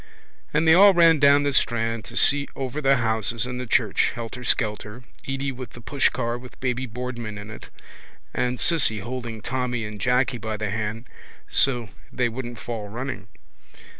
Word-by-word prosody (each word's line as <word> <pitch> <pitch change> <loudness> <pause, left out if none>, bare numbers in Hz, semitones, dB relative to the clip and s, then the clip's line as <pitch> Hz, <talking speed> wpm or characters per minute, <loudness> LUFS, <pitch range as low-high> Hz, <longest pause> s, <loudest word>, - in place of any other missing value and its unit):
And 155 +2 +1
they 160 - +8
all 195 +2 +7
ran 165 -2 +6
down 140 0 +5
the 145 -1 0
strand 115 -2 0
to 120 - -8
see 140 0 +6
over 135 +2 -4
the 135 -1 +4
houses 110 -1 0
and 125 0 -5
the 125 - -6
church, - - +2
helterskelter, 115 -1 -2 0.2
Edy 135 0 -2
with 125 -2 -9
the - - -11
pushcar 120 -2 0
with 125 0 -14
baby 130 0 -2
Boardman 120 -2 -6
in 105 +2 -9
it 110 - -10 0.6
and 125 0 -1
Cissy 140 -11 +2
holding 120 0 -6
Tommy 125 -2 -2
and 105 -1 -8
Jacky 125 +1 +1
by 110 -1 -4
the 105 -1 -3
hand 110 +2 -4 0.4
so 120 -5 +1 0.2
they 125 -1 0
wouldn't 120 0 -6
fall 110 -3 -6
running. 125 +5 -6
125 Hz, 165 wpm, -24 LUFS, 115-130 Hz, 0.6 s, they